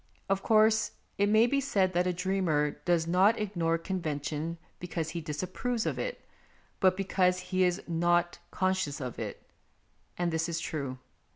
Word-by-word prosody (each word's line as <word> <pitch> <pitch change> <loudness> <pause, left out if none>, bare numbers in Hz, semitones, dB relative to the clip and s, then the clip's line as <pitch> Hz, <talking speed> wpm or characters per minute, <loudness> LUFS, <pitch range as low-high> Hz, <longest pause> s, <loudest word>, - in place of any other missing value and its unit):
Of 195 0 +1
course, 220 0 +4 0.3
it 205 0 +3
may 220 +2 +6
be 275 +3 +1
said 195 -8 +1
that 180 +1 +2
a - - +2
dreamer 180 -5 +1
does 170 -2 +2
not 185 +6 +4
ignore 170 -6 0
convention 160 -2 -3 0.2
because 165 -2 -3
he 170 0 -4
dis 150 +1 -4
approves 230 +5 -2
of - - -1
it, - - -4 0.5
but 185 -1 +4
because 185 -2 +2
he 185 0 +4
is 180 +1 +1
not 175 +1 +1
con 185 0 +1
scious 150 -5 -3
of 125 -3 -5
it; - - -5 0.7
and 175 -1 0
this 160 +1 0
is 165 0 -2
true. 140 -6 -4
180 Hz, 170 wpm, -30 LUFS, 165-195 Hz, 0.7 s, may